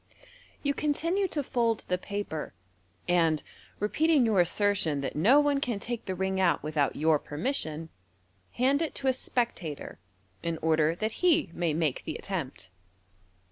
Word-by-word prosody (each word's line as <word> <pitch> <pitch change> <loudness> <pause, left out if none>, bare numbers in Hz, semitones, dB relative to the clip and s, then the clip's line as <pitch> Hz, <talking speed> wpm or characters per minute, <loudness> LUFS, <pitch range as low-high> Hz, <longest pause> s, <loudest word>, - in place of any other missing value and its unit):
You 285 -1 +1
continue 335 +7 0
to 300 -5 -2
fold 235 -4 0
the 180 0 0
paper, 200 - -5 0.5
and 165 -3 +2 0.4
repeating 295 +6 +3
your 215 -4 +3
assertion 175 -5 +2
that 135 - -4
no 245 - +5
poe 290 -1 +2
can 245 -6 -1
take 235 +3 -5
the 190 - -3
ring 190 +1 -1
out 170 -7 +2
without 150 -2 0
your 155 0 +3
permission, 160 - -3 0.6
hand 270 +4 +2
it 325 - -2
to 270 - -2
a - - +3
spec 245 -2 -1
tator, 155 - -7 0.4
in 170 -1 -2
order 160 0 +3
that 215 +4 -4
he 330 - +3
may 170 -4 0
make 155 -5 0
the 155 - -5
attempt. 140 - -5
190 Hz, 155 wpm, -29 LUFS, 160-260 Hz, 0.6 s, no